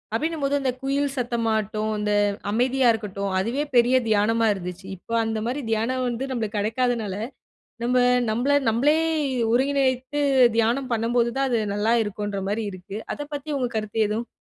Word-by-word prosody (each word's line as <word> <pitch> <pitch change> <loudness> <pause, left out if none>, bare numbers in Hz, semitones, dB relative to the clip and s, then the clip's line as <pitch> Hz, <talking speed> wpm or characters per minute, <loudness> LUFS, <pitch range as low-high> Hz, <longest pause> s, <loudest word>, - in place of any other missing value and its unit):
அப்டின்னும் 315 +2 -2
போது 280 +1 +1
அந்த 265 -2 0
குயில் 275 0 0
சத்தமாட்டும், 220 -3 -1
அந்த 210 0 -1 0.4
அமைதியா 250 +3 +2
இருக்கட்டும். 200 -3 -4
அதுவே 245 +9 -1
பெரிய 240 +2 +5
தியானமா 225 +2 +2
இருந்துச்சு. 180 0 -7
இப்போ 230 - -9
அந்த 220 -1 -2
மாரி 275 +4 -2
தியானம் 250 +4 0
வந்து 240 +2 -2
நம்ளுக்கு 220 -4 -2
கெடைக்காதனால, 225 -1 0 0.7
நம்ம 250 +1 +2 0.3
நம்மள 245 +6 +1 0.2
நம்மளே 280 +8 +3 0.6
ஒருங்கிணைத்து 265 +1 +1 0.4
தியானம் 245 +4 +1
பண்ணும்போது 235 +1 +1
தான் 275 0 +1
அது 235 -2 +1
நல்லா 215 +3 +1
இருக்குன்ற 205 -1 -4
மாரி 220 +2 -1
இருக்கு. 185 +2 -8 0.2
அத - - -7
பத்தி 290 +1 -5
உங்க 250 -2 0
கருத்து 215 0 -3
எதுவும் 225 +3 -3
235 Hz, 150 wpm, -24 LUFS, 215-260 Hz, 0.7 s, பெரிய